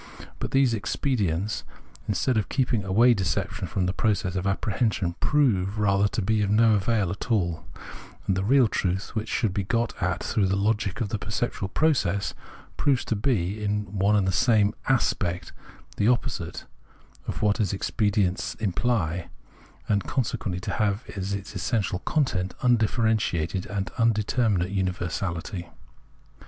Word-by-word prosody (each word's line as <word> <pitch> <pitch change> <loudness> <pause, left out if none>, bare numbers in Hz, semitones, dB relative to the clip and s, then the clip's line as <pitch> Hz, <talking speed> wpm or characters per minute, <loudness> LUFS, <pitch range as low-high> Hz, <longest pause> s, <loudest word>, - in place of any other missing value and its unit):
But - - -3
these 135 -3 +3
expedients, 105 - -1 0.4
instead 105 +5 +1
of 110 - 0
keeping 125 -5 +1
away 115 +6 +5
deception 95 0 -2
from 90 +4 -1
the 90 - 0
process 100 -3 0
of 95 +1 -1
apprehension, 100 -2 0
prove 110 -9 +2
rather 100 -1 +3
to 100 - -2
be 110 +2 +1
of 100 - +1
no 110 +1 +5
avail 105 -2 +1
at 100 - -6
all; 90 -8 0 0.6
and 95 - +1
the 95 - -1
real 130 +3 +5
truth, 95 -1 -2
which 110 0 -3
should 110 -6 0
be 100 - -1
got 115 +4 0
at 90 0 0
through 100 -3 +1
the 95 - +1
logic 100 0 0
of 105 - -1
the 110 - -2
perceptual 105 -1 -2
process, 100 - +1 0.4
proves 135 -4 +2
to 115 - 0
be 105 -3 0
in 105 0 0
one 100 +2 +3
and 100 -2 +2
the - - +2
same 105 -2 +3 0.2
"aspect" 90 -8 0 0.4
the 105 - +2
oppo 125 -1 +2
site - - -6 0.6
(of - - -3
what 105 0 +3
those 105 -6 0
expedients 105 +2 0
imply), 95 -5 -1 0.6
and 100 -1 +1
consequently 105 -8 -2
to - - -3
have 105 +1 0
as 100 0 -2
its 100 +1 -7
essential 95 0 -1
content 95 -10 0
undifferentiated 110 -6 +1
and 100 -1 -3
in 115 0 +4
determinate 105 -4 +1
universality. 90 -1 -3
100 Hz, 155 wpm, -26 LUFS, 95-115 Hz, 0.6 s, away